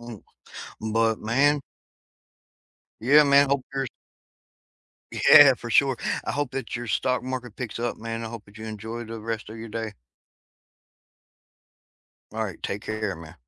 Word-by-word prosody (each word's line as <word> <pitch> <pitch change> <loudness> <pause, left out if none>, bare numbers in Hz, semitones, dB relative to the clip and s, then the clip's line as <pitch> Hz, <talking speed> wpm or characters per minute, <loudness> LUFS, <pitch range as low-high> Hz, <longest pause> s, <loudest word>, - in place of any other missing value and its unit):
M 120 -3 -9 0.7
but, 115 -1 +2
man. 140 +6 +2 1.4
yeah, 140 +7 +6
man, 140 0 +5
hope 140 -2 0
your 135 -1 -1 1.3
Yeah, 140 -3 +8
for 120 -1 -8
sure, 135 +1 +4 0.3
I - - -2
hope 145 -3 -2
that 130 -3 -5
your 120 0 -4
stock 125 +4 0
market 125 -3 -5
picks 120 -3 -5
up, 120 0 -2
man, 115 0 -5
I 115 - -5
hope 115 -2 -9
that 100 +1 -15
you 110 - -8
enjoy 110 +2 -6
the 115 0 -7
rest 110 -1 -4
of 110 - -9
your 115 0 -8
day. 110 -1 -4 2.4
Alright, 110 -5 -4
take 100 - -4
care, 110 -4 -3
man. 80 0 -12
115 Hz, 145 wpm, -25 LUFS, 110-130 Hz, 2.4 s, Yeah